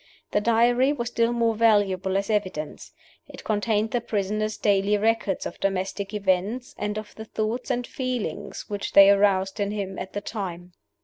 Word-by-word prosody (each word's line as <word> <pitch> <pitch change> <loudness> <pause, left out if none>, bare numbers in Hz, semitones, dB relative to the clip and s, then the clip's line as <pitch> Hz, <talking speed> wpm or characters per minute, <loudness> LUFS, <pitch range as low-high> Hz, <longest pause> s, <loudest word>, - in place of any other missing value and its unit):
The 205 - +2
Diary 240 +4 +3
was 240 -4 -3
still 230 0 +1
more 230 -1 +1
valuable 200 -4 +2
as 200 +2 -1
evidence. 185 -8 -3 0.4
It - - -11
contained 215 0 0
the 245 - 0
prisoner's 215 0 -2
daily 200 0 +2
record 215 -3 0
of - - -6
domestic 195 +1 -2
events, 205 +4 -1
and 210 0 -3
of 215 -1 -7
the 220 - -9
thoughts 220 +4 -3
and 245 -1 -1
feelings 245 -6 -4
which 205 -1 -4
they 200 0 +9
aroused 195 0 +2
in 200 -1 0
him 200 -2 -4
at 190 - -7
the 205 - -3
time. 180 -5 -6
210 Hz, 170 wpm, -25 LUFS, 195-225 Hz, 0.4 s, they